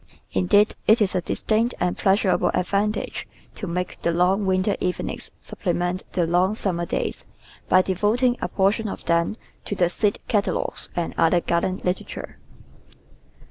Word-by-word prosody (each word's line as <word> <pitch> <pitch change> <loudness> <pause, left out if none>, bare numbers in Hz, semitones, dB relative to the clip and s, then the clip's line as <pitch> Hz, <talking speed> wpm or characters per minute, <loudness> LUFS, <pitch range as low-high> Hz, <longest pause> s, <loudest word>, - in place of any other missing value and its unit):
Indeed, 205 - +3
it 220 +3 +6
is 205 -3 +2
a 185 - +1
distinct 225 +7 0
and 180 0 0
pleasurable 195 -1 +2
advantage 200 +4 -1 0.3
to 200 - -6
make 180 +1 -3
the 170 - +1
long 185 +4 +2
winter 190 +2 +2
evenings 180 0 -3
sup - - -12
plement 180 -1 0
the 175 - +2
long 180 +5 +2
summer 175 -5 -1
days - - -2 0.5
by 185 0 +6
devoting 215 +7 +2
a - - 0
portion 205 +3 +1
of - - -6
them 170 +5 +1 0.3
to 205 - -3
the 175 -2 +2
seed 205 +3 0
catalogues 205 -2 -1
and 170 -1 -2
other 165 +2 +4
garden 170 +2 -1
literature. 180 +1 -4
185 Hz, 150 wpm, -23 LUFS, 175-205 Hz, 0.5 s, it